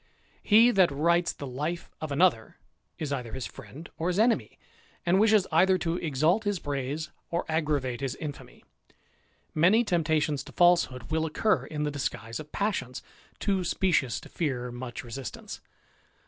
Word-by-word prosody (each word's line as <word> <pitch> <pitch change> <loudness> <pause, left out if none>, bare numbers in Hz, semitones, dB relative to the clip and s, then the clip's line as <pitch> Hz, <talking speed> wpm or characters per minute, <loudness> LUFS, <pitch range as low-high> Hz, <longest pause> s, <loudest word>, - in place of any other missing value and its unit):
He 225 +3 +6
that 190 -5 +4
writes 170 +5 +2
the 140 - -8
life 150 +7 -4
of 155 -2 -4
another 140 -7 +2 0.4
is 150 -3 -3
either 125 -4 -4
his 130 - -4
friend 160 +4 -10
or 165 +2 0
Viis 180 - -1
enemy, 225 +2 +2 0.5
and 180 +2 +4
wishes 215 -2 +5
either 185 +4 +4
to 170 -1 -1
exalt 160 +6 +1
his 205 -2 0
praise 145 +1 -4 0.2
or 170 +1 -1
aggravate 150 -6 -1
^is 135 -2 -2
infamy: 150 -3 -8 0.9
many 185 +9 +4
temptations 160 - 0
to - - -11
falsehood 170 -9 +3
will 160 0 +1
occur 210 +7 +1
in 150 -1 -3
the 150 - -1
disguise 115 -5 -4
of 155 -1 -10
passions, 160 -12 -2 0.3
too 195 -3 0
specious 170 -8 +1
to - - -12
fear 125 -7 -2
much 120 +1 -6
resist 125 +2 -6
ance. - - -9
155 Hz, 160 wpm, -28 LUFS, 135-180 Hz, 0.9 s, He